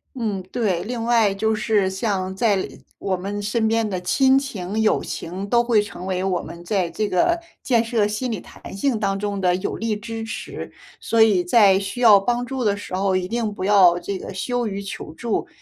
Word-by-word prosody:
嗯， 210 Hz, -6 st, -2 dB
对。 205 Hz, -8 st, 0 dB
另 235 Hz, +2 st, -4 dB
外 225 Hz, -4 st, +3 dB
就 220 Hz, +2 st, 0 dB
是 210 Hz, -3 st, +1 dB
像 190 Hz, -1 st, -2 dB
在 200 Hz, -3 st, +1 dB, 0.3 s
我 190 Hz, -1 st, -1 dB
们 200 Hz, +3 st, -4 dB
身 215 Hz, +2 st, 0 dB
边 225 Hz, -1 st, +1 dB
的 185 Hz, -2 st, -2 dB
亲 265 Hz, +8 st, +3 dB
情 215 Hz, -6 st, -3 dB
友 215 Hz, -, +2 dB
情 185 Hz, +4 st, -5 dB
都 235 Hz, +2 st, +3 dB
会 230 Hz, -3 st, +3 dB
成 185 Hz, -3 st, -8 dB
为 185 Hz, -1 st, -1 dB
我 190 Hz, -2 st, 0 dB
们 170 Hz, -, -10 dB
在 185 Hz, -2 st, 0 dB
这 215 Hz, +3 st, -2 dB
个 340 Hz, -, +2 dB, 0.2 s
建 235 Hz, -3 st, +3 dB
设 225 Hz, -3 st, +1 dB
心 215 Hz, +5 st, -2 dB
理 215 Hz, -5 st, -3 dB
弹 -, -, -11 dB
性 235 Hz, +1 st, 0 dB
当 195 Hz, -2 st, 0 dB
中 200 Hz, 0 st, -3 dB
的 180 Hz, -2 st, +2 dB
有 185 Hz, -, -3 dB
力 225 Hz, -1 st, -1 dB
支 225 Hz, +1 st, -6 dB
持。 225 Hz, -, -6 dB, 0.3 s
所 230 Hz, -1 st, +1 dB
以 195 Hz, -5 st, +4 dB
在 195 Hz, -1 st, +5 dB
需 200 Hz, +5 st, -5 dB
要 215 Hz, -5 st, +8 dB
帮 245 Hz, +4 st, -1 dB
助 265 Hz, 0 st, -4 dB
的 205 Hz, -3 st, +2 dB
时 200 Hz, -2 st, -9 dB
候， 190 Hz, 0 st, +1 dB
一 185 Hz, -1 st, 0 dB
定 230 Hz, -2 st, -1 dB
不 195 Hz, -, -6 dB
要 190 Hz, -3 st, +5 dB
这 190 Hz, +2 st, -4 dB
个 190 Hz, -, -7 dB
羞 240 Hz, +5 st, -2 dB
于 200 Hz, 0 st, -4 dB
求 195 Hz, -5 st, -7 dB
助， 225 Hz, +7 st, -2 dB
205 Hz, 225 characters per minute, -22 LUFS, 190-230 Hz, 0.3 s, 要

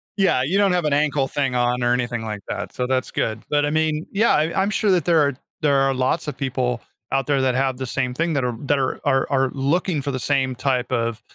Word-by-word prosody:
Yeah, 195 Hz, -10 st, +2 dB
you 175 Hz, +9 st, 0 dB
don't 200 Hz, -2 st, +4 dB
have 175 Hz, -3 st, +1 dB
an 150 Hz, -, +1 dB
ankle 145 Hz, -2 st, +1 dB
thing 135 Hz, -2 st, -1 dB
on 125 Hz, 0 st, +1 dB
or 120 Hz, 0 st, +3 dB
anything 120 Hz, -2 st, -2 dB
like 105 Hz, -2 st, -5 dB
that, -, -, -5 dB
so 125 Hz, -, -2 dB
that's 130 Hz, -1 st, -1 dB
good. 110 Hz, 0 st, -2 dB
But 145 Hz, 0 st, +2 dB
I -, -, 0 dB
mean, 155 Hz, 0 st, 0 dB
yeah, 220 Hz, +4 st, +3 dB
I 160 Hz, +5 st, +1 dB
I'm 195 Hz, -, +1 dB
sure 210 Hz, -1 st, 0 dB
that 175 Hz, -5 st, +2 dB
there 170 Hz, -2 st, +4 dB
are 145 Hz, -1 st, +2 dB, 0.3 s
there 145 Hz, -2 st, +3 dB
are 135 Hz, 0 st, +3 dB
lots 130 Hz, +3 st, 0 dB
of 150 Hz, -, -3 dB
people 125 Hz, -3 st, -1 dB, 0.3 s
out 135 Hz, -1 st, 0 dB
there 140 Hz, -2 st, +2 dB
that 130 Hz, -1 st, +1 dB
have 130 Hz, -1 st, 0 dB
the 130 Hz, -, -4 dB
same 125 Hz, 0 st, -1 dB
thing 165 Hz, +4 st, -1 dB
that 140 Hz, -3 st, 0 dB
are 120 Hz, -, -2 dB
that 145 Hz, 0 st, +1 dB
are 130 Hz, -, -1 dB
are 135 Hz, -1 st, +2 dB
looking 150 Hz, +4 st, 0 dB
for 140 Hz, +1 st, -3 dB
the 130 Hz, -, -3 dB
same 130 Hz, -1 st, 0 dB
type 130 Hz, -1 st, -1 dB
of 115 Hz, -2 st, -1 dB
135 Hz, 255 wpm, -22 LUFS, 125-150 Hz, 0.3 s, don't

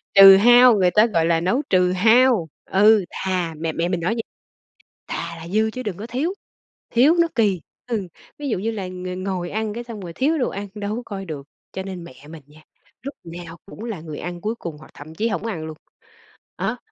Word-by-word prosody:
Trừ 195 Hz, 0 st, +11 dB
hao, 245 Hz, +2 st, +7 dB
người 185 Hz, -3 st, +3 dB
ta, 215 Hz, +3 st, +5 dB
gọi 170 Hz, -7 st, +1 dB
là, 165 Hz, 0 st, +2 dB
nấu 190 Hz, +11 st, +1 dB
trừ 180 Hz, -1 st, +3 dB
hao. 225 Hz, -1 st, +4 dB, 0.2 s
Ừ, 210 Hz, 0 st, +4 dB
thà 180 Hz, -3 st, -2 dB
mẹ 160 Hz, +1 st, -2 dB
mẹ 165 Hz, +2 st, -1 dB
mình 180 Hz, -, -1 dB
nói 175 Hz, +6 st, 0 dB
vậy: 225 Hz, -, -3 dB, 0.8 s
"Thà 170 Hz, 0 st, -4 dB
là 165 Hz, -, -9 dB
dư 215 Hz, +4 st, +1 dB
chứ 255 Hz, +3 st, -6 dB
đừng 205 Hz, -6 st, -4 dB
có 215 Hz, +3 st, -7 dB
thiếu, 275 Hz, +10 st, -1 dB, 0.6 s
thiếu 275 Hz, +8 st, +4 dB
nó 335 Hz, -, +3 dB
kì." 205 Hz, -6 st, +2 dB, 0.3 s
Ừ, 220 Hz, -7 st, -3 dB, 0.3 s
ví 290 Hz, -1 st, -4 dB
dụ 225 Hz, -, 0 dB
như 220 Hz, +4 st, -1 dB
là 200 Hz, -4 st, -4 dB
ng 185 Hz, 0 st, -6 dB
ngồi 185 Hz, -3 st, -3 dB
ăn 215 Hz, 0 st, -2 dB
cái 240 Hz, +1 st, -5 dB
xong 230 Hz, -3 st, -8 dB
rồi 175 Hz, -3 st, -7 dB
thiếu 300 Hz, -, +1 dB
đồ 255 Hz, -, +1 dB
ăn 200 Hz, +1 st, -6 dB
đâu 210 Hz, 0 st, -3 dB
có 245 Hz, -, -4 dB
coi 195 Hz, -2 st, -6 dB
được, 150 Hz, -6 st, -7 dB, 0.3 s
cho 190 Hz, -, -4 dB
nên 185 Hz, -3 st, -7 dB
mẹ 135 Hz, -1 st, -14 dB
mình 160 Hz, -2 st, -10 dB
nha, 150 Hz, +1 st, -18 dB, 0.4 s
lúc 280 Hz, +3 st, -6 dB
nào 170 Hz, 0 st, -9 dB
cũng 210 Hz, +3 st, -10 dB
là 220 Hz, -8 st, -5 dB
người 155 Hz, -2 st, -8 dB
ăn 175 Hz, 0 st, -6 dB
cuối 215 Hz, +2 st, -2 dB
cùng 170 Hz, -9 st, -7 dB
hoặc 155 Hz, -, -15 dB
thậm 155 Hz, +2 st, -11 dB
chí 220 Hz, +7 st, 0 dB
hổng 220 Hz, -, -3 dB
ăn 175 Hz, -8 st, -4 dB
luôn. 155 Hz, -1 st, -8 dB, 0.8 s
Đó, -, -, -2 dB
195 Hz, 225 wpm, -22 LUFS, 170-225 Hz, 0.8 s, Trừ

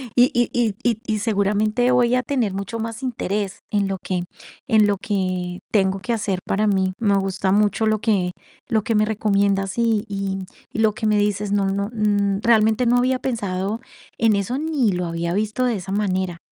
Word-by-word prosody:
y 245 Hz, +1 st, +5 dB
y 240 Hz, -1 st, +2 dB
y 230 Hz, -4 st, +1 dB
y 230 Hz, -3 st, +1 dB
y 215 Hz, -1 st, 0 dB
seguramente 215 Hz, +3 st, +1 dB
voy 245 Hz, 0 st, +3 dB
a 255 Hz, -, +2 dB
tener 240 Hz, -9 st, -1 dB
mucho 200 Hz, +3 st, -4 dB
más 225 Hz, +2 st, -5 dB
interés 205 Hz, -5 st, -2 dB
en 200 Hz, -2 st, +1 dB
lo 195 Hz, -, -2 dB
que 180 Hz, -2 st, -2 dB, 0.4 s
en 220 Hz, -4 st, +5 dB
lo 200 Hz, -, +1 dB
que 185 Hz, -3 st, -2 dB
tengo 195 Hz, -2 st, +2 dB
que 210 Hz, +6 st, -2 dB
hacer 200 Hz, -4 st, -1 dB
para 210 Hz, +2 st, +1 dB
mí. 190 Hz, -2 st, +1 dB
Me 205 Hz, -3 st, +2 dB
gusta 195 Hz, 0 st, -1 dB
mucho 210 Hz, +2 st, +2 dB
lo 215 Hz, -1 st, +2 dB
que 195 Hz, -5 st, +1 dB, 0.4 s
lo 220 Hz, -3 st, +1 dB
que 225 Hz, -, 0 dB
me 215 Hz, 0 st, +4 dB
recomiendas 200 Hz, -2 st, 0 dB
y 225 Hz, -2 st, +2 dB
y 195 Hz, -1 st, -2 dB, 0.3 s
y -, -, -5 dB
lo 220 Hz, -1 st, +3 dB
que 215 Hz, -, -2 dB
me 210 Hz, -1 st, +3 dB
dices, 205 Hz, 0 st, 0 dB
no 200 Hz, -1 st, +2 dB
no, 200 Hz, +1 st, -1 dB
mm, 205 Hz, -2 st, +1 dB
realmente 220 Hz, +1 st, +4 dB
no 240 Hz, +1 st, +4 dB
había 255 Hz, +1 st, +2 dB
pensado 205 Hz, -3 st, -2 dB, 0.4 s
en 225 Hz, -2 st, +4 dB
eso 200 Hz, +6 st, -1 dB
ni 295 Hz, -9 st, +1 dB
lo 180 Hz, 0 st, -2 dB
había 170 Hz, +1 st, -2 dB
visto 215 Hz, +5 st, 0 dB
de 240 Hz, -3 st, +1 dB
esa 190 Hz, +1 st, -7 dB
manera. 185 Hz, -3 st, -1 dB
210 Hz, 200 wpm, -22 LUFS, 195-225 Hz, 0.4 s, y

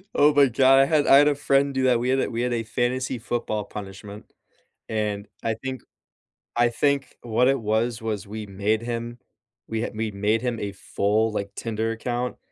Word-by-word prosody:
Oh 150 Hz, +1 st, +5 dB
my 145 Hz, -1 st, +6 dB
god, 135 Hz, +2 st, +5 dB
I 135 Hz, -, +6 dB
had 150 Hz, 0 st, +2 dB
I 135 Hz, -, +7 dB
had 145 Hz, -, +6 dB
a 145 Hz, -, +3 dB
friend 140 Hz, 0 st, +2 dB
do 130 Hz, -, 0 dB
that, 125 Hz, -2 st, +3 dB
we 125 Hz, +2 st, -1 dB
had 135 Hz, -, +2 dB
a -, -, 0 dB
we 115 Hz, -1 st, -3 dB
had 125 Hz, 0 st, 0 dB
a 115 Hz, -, -1 dB
fantasy 125 Hz, +2 st, -1 dB
football 110 Hz, -2 st, -2 dB
punishment, 100 Hz, +1 st, -9 dB, 0.6 s
and 105 Hz, -2 st, -2 dB
I 115 Hz, -, 0 dB
think 130 Hz, +2 st, -6 dB, 0.7 s
I 120 Hz, 0 st, +4 dB
think 140 Hz, +3 st, 0 dB
what 120 Hz, +1 st, +2 dB
it 135 Hz, -1 st, +2 dB
was, 110 Hz, +1 st, 0 dB
was 110 Hz, -3 st, -3 dB
we 105 Hz, +1 st, -7 dB
made 100 Hz, +3 st, 0 dB
him 120 Hz, 0 st, -5 dB, 0.5 s
we 110 Hz, 0 st, -2 dB
had 115 Hz, -, -4 dB
we'd 110 Hz, -2 st, -3 dB
made 105 Hz, +3 st, +1 dB
him 120 Hz, -2 st, -2 dB
a 100 Hz, -1 st, -3 dB
full, 105 Hz, +3 st, 0 dB
like, 100 Hz, -1 st, -4 dB
Tinder 115 Hz, 0 st, -2 dB
account, 120 Hz, +2 st, -3 dB
115 Hz, 200 wpm, -24 LUFS, 110-130 Hz, 0.7 s, I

